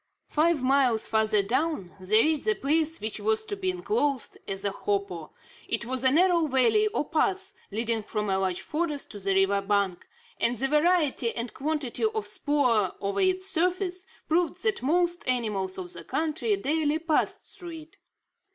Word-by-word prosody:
Five 310 -2 +2
miles 255 -4 +3
farther 215 -2 +2
down, 250 - -1
they 215 +4 +4
reached 310 -1 +1
the 435 0 +2
place 320 +2 +1
which 215 0 -2
was 440 0 +1
to 420 - -4
be 380 -2 -2
enclosed 355 - -1
as 195 +1 -3
a 200 - +1
hopo. 195 -5 -3 0.4
It 230 +1 -2
was 260 +1 -1
a 260 - +6
narrow 340 +2 +3
valley 270 - +3
or 420 -8 -2
pass, 385 +4 0 0.2
leading 225 +2 0
from 210 0 -3
a 190 -1 +1
large 185 -2 -1
forest 300 -2 -3
to 205 - -6
the 195 0 0
river 195 +1 +3
bank, 195 -3 -1 0.3
and 235 +1 +1
the 270 - +2
variety 300 -5 +2
and 235 -1 -4
quantity 295 - -2
of 435 - -2
spoor 250 -10 +1
over 200 - -1
its 375 0 +2
surface, 365 0 -1 0.2
proved 335 +1 0
that 435 -3 0
most 345 +5 +1
animals 210 -7 -1
of 180 -2 -5
the 170 - -8
country 320 - -1
daily 310 -4 0
passed 320 -1 0 0.2
through 335 -3 -8
it. 310 +2 -18
285 Hz, 170 wpm, -27 LUFS, 215-345 Hz, 0.4 s, a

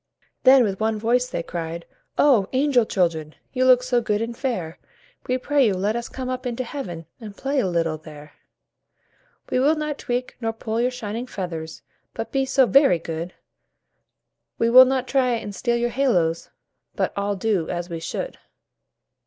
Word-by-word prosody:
Then 260 -1 +8
with 195 -4 -2
one 220 0 0
voice 245 +3 +1
they 170 - -3
cried: 165 0 -5 0.3
"Oh! 240 -10 +4
angel 260 -4 +3
Children, 160 -4 -1 0.2
You 255 0 +1
look 250 -1 +6
so 250 -1 +1
good 210 -2 0
and 230 +1 -3
fair, 230 - -3 0.5
We 255 - +1
pray 275 0 +2
you, 200 - +1
let 205 +4 0
us 235 0 -4
come 260 -1 -6
up 255 0 -3
into 245 +1 -3
Heaven 180 - -6
And 210 -4 -10
play 275 +1 -1
a 235 - +1
little 165 -3 -1
there. 150 -1 -12 1.2
"We 255 - +2
will 290 +5 +4
not 300 -1 -3
tweak 245 0 -3
nor 225 -1 -1
pull 225 0 -3
your 250 - +2
shining 235 -1 -5
feathers, 165 -7 -6 0.3
But 225 0 -5
be 270 0 +1
so 265 0 +4
very 270 - +5
good; 165 +2 -6 1.2
We 230 0 +2
will 255 +1 +10
not 260 0 -1
try 255 -2 +2
and 215 -3 -4
steal 235 +5 0
your 240 0 0
little 265 +1 +1
halos, 165 -1 0 0.5
But - - -1
all 200 0 -1
do 190 -4 0
as 175 0 -3
we 170 -2 -5
should." 175 - -5
230 Hz, 180 wpm, -23 LUFS, 180-255 Hz, 1.2 s, will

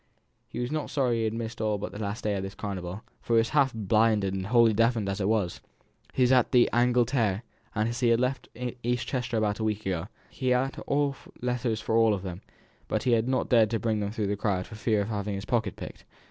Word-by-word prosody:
He - - -9
was 120 +2 -2
not 155 -1 -2
sorry 125 -5 +1
he - - 0
had 110 - -1
missed 115 0 -5
all 105 -1 +1
but 100 - -5
this 105 - -7
last 105 +2 -4
day 105 - 0
of 95 0 -5
carnival, 95 0 -5 0.2
for 115 - 0
he - - +6
was 115 0 +3
half 140 -3 +3
blinded 110 -2 +2
and 95 0 -3
wholly 115 0 +5
deafened, 115 -1 +2
as 100 +1 -2
it 95 - +1
was. 105 -6 0 0.5
He 130 - +2
was 125 - +4
at 125 -2 +4
the 125 -1 +5
"Angleterre;" 120 -3 +2 0.6
he 120 - +2
had 115 0 +4
left 130 +2 -1 0.3
East 120 +1 -1
Chester 120 -3 -2
about 105 -1 0
a - - -1
week 110 -1 -1
ago; 90 -4 -2 0.2
he 130 - -4
had 130 +2 +1 0.6
letters 120 -3 -1
for 110 - -1
all 115 -2 +5
of 95 - -7
them, 90 -1 -6 0.5
but - - -1
had 115 -2 +2
not 130 - 0
dared 115 -3 +5
to 115 0 -1
bring 110 -1 0
them 100 -1 -1
through 105 0 -2
the 100 +1 0
crowd 100 -3 -1
for - - -12
fear 110 -1 +1
of 100 - -3
having 105 -1 -2
his 100 +1 -5
pocket 110 -5 0
picked. - - -9
110 Hz, 230 wpm, -28 LUFS, 100-120 Hz, 0.6 s, he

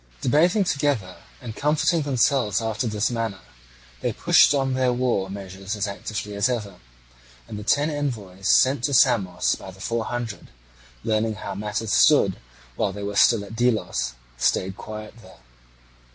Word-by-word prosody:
Debating 170 - +3
together 140 - -1 0.2
and 115 -3 -7
comforting 155 +3 +1
themselves 130 -6 +1
after 110 +1 -2
this 105 +2 0
manner, 115 -5 -3 0.6
they - - 0
pushed - - +5
on 135 -2 +1
their 130 -1 +2
war 120 -6 0
measures 95 +1 -6
as 105 0 -1
actively 105 +1 -5
as 100 +5 +1
ever; 110 -5 -4 0.7
and 105 - -7
the - - -7
ten 145 +7 +2
envoys 105 -10 -4
sent 130 -1 +4
to 140 0 +1
Samos 100 -9 +3
by 95 - -8
the 95 +1 -13
Four 115 +2 -2
Hundred, 120 -3 -5 0.6
learning 110 0 0
how 100 0 -6
matters 105 +2 -3
stood 100 -11 +4 0.4
while 95 - 0
they 100 +1 -7
were 100 0 -4
still 105 -1 +4
at 110 - -10
Delos, 120 - 0 0.3
stayed 95 +8 +1
quiet 110 0 -8
there. 95 -3 -16
110 Hz, 155 wpm, -24 LUFS, 100-130 Hz, 0.7 s, pushed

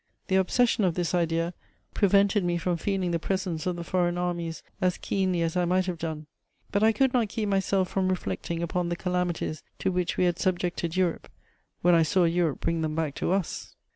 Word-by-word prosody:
The 190 - +2
obsession 220 +4 +3
of 175 -3 +2
this 175 -1 -1
idea 165 0 +1 0.4
prevented 200 0 +3
me 175 -1 +1
from 175 +1 0
feeling 185 +1 -1
the 170 - 0
presence 185 -2 -2
of 180 - 0
the 170 - -5
foreign 175 0 0
armies 175 -2 -3 0.2
as 180 -1 +2
keenly 185 -3 0
as 165 +1 -1
I 180 -1 +2
might 185 +1 +2
have 180 -3 -3
done: 160 -2 -4 0.5
but 200 - +1
I 220 +1 +6
could 260 +4 +2
not 235 -4 +2
keep 215 +1 -2
myself 195 -1 +1
from 190 -1 0
reflecting 170 - -2
upon 170 +1 -1
the 175 - -1
calamities 175 -4 -2 0.2
to - - 0
which 180 -1 -1
we - - +3
had 175 -1 +1
subjected 175 -2 -1
Europe, 180 -3 0 0.5
when 175 0 +5
I 165 - +6
saw 180 +4 +3
Europe 170 -3 +1
bring 165 -1 0
them 155 -1 -1
back 160 -3 -1
to - - -1
us. 190 -3 -2
180 Hz, 205 wpm, -27 LUFS, 170-190 Hz, 0.5 s, I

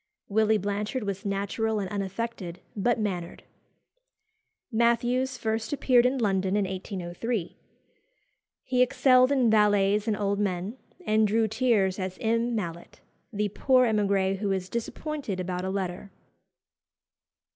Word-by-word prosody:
Willy 220 +1 +3
Blanchard 210 +5 -2
was 200 0 -4
natural 200 +3 -1
and 195 - -2
unaffected, 195 -2 -4 0.2
but 235 +3 +1
mannered. 180 -5 -3 1.3
Mathews 240 +3 +1
first 220 +3 -2
appeared 250 -3 +4
in 265 +2 -1
London 195 -4 +1
in 205 -1 +2
1803. 190 +2 -4 1.1
He 255 -1 +1
excelled 255 0 +4
in 255 -5 +3
valets 205 -1 +3
and 215 -2 +1
old 200 0 0
men, 195 +2 -2 0.3
and 215 0 +3
drew 220 +2 +2
tears 215 -4 +1
as 185 -1 -4
M. 230 +1 0
Mallet, 170 -5 -5 0.3
the 210 -1 -1
poor 255 +5 +3
emigré 200 -3 +1
who 200 -1 -1
is 190 -1 -2
disappointed 235 -2 -4
about 180 0 -3
a - - -2
letter. 190 0 -4
210 Hz, 125 wpm, -27 LUFS, 195-235 Hz, 1.3 s, appeared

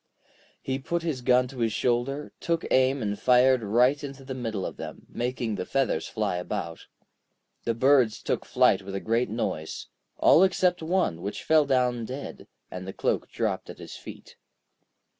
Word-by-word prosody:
He 130 0 -2
put 170 +5 -2
his 155 -7 -2
gun 125 +1 +3
to 130 - -10
his 115 -1 +1
shoulder, 125 +6 -1
took 165 -1 -1
aim 130 0 +3
and 100 -1 -2
fired 125 0 +5
right 125 +7 +2
into 135 -1 -8
the 130 - -5
middle 115 -6 -3
of - - -6
them, - - -8
making 120 -2 -3
the 100 - -3
feathers 130 -12 0
fly 105 -5 -1
about. 85 -2 -5 0.8
The 115 - 0
birds 130 -3 +3
took - - -1
flight 95 - +3
with 95 0 -7
a - - -1
great 115 +2 0
noise, 80 -8 -4 0.3
all - - +6
except 180 -2 +3
one, 160 - 0
which 100 - -5
fell 155 -2 +4
down 125 -3 +1
dead, 130 +4 -7 0.2
and 90 +1 -7
the 95 - -5
cloak - - -1
dropped - - -2
at - - -8
his - - -9
feet. - - -11
125 Hz, 175 wpm, -27 LUFS, 110-135 Hz, 0.8 s, all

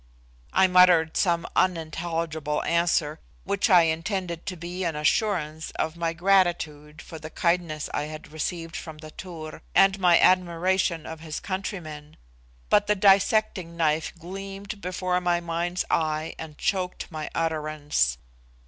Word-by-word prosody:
I 190 - +5
muttered 180 -3 +5
some 170 -3 +1
unintelligible 165 -3 -1
answer, 165 -2 +1 0.2
which 200 +3 0
I 180 -3 +7
intended 170 +1 -2
to 185 - -4
be 175 +3 -5
an 165 -3 -1
assurance 155 -1 0
of 160 - -1
my 170 -1 -1
gratitude 170 -4 +1
for 160 - -9
the 155 0 -8
kindness 170 -3 0
I 145 - -1
had 155 0 -9
received 165 +1 -4
from 160 -2 -7
the 155 0 -11
Tur, 160 -4 -9
and 195 0 +5
my 175 -2 +5
admiration 180 -1 +2
of 160 -1 -7
his 155 -1 -5
countrymen, 160 -6 -6 0.5
but 205 0 +3
the 210 - +3
dissecting 195 -3 +3
knife 155 -1 +1
gleamed 195 +3 -7
before 180 0 -1
my 175 -1 +1
mind's 170 +1 -2
eye 155 0 0
and 155 -2 -8
choked 185 -3 -2
my 155 -2 -5
utterance. 155 - 0
170 Hz, 140 wpm, -26 LUFS, 155-185 Hz, 0.5 s, I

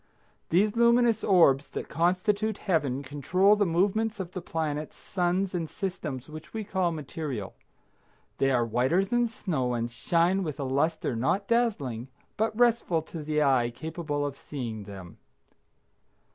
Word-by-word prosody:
These 205 +6 +3
luminous 235 -1 +4
orbs 155 -8 +5
that - - -5
constitute 200 +5 +1
Heaven 145 -7 0
control 165 +9 +3
the 205 -2 +2
movements 205 +5 +1
of 180 -2 -5
the 185 - -5
planets, 155 -3 -3
suns 185 +1 -1
and 165 -3 -2
systems 155 -9 -4
which 155 +6 -10
we 220 - -2
call 190 -4 0
material. 145 -8 -5 0.9
They 135 - +3
are 120 -3 +2
whiter 130 - +2
than 240 +4 +1
snow 135 - -2
and 120 0 -2
shine 170 +9 +1
with 155 -6 -4
a - - -1
luster 140 0 0
not 160 - 0
dazzling, 155 - 0 0.3
but 220 0 -1
restful 230 -9 +3
to 165 0 -8
the 150 0 +1
eye 130 -4 +3
capable 150 +2 -3
of 140 -1 -4
seeing 115 -7 -6
them. 95 -3 -10
165 Hz, 145 wpm, -28 LUFS, 135-195 Hz, 0.9 s, orbs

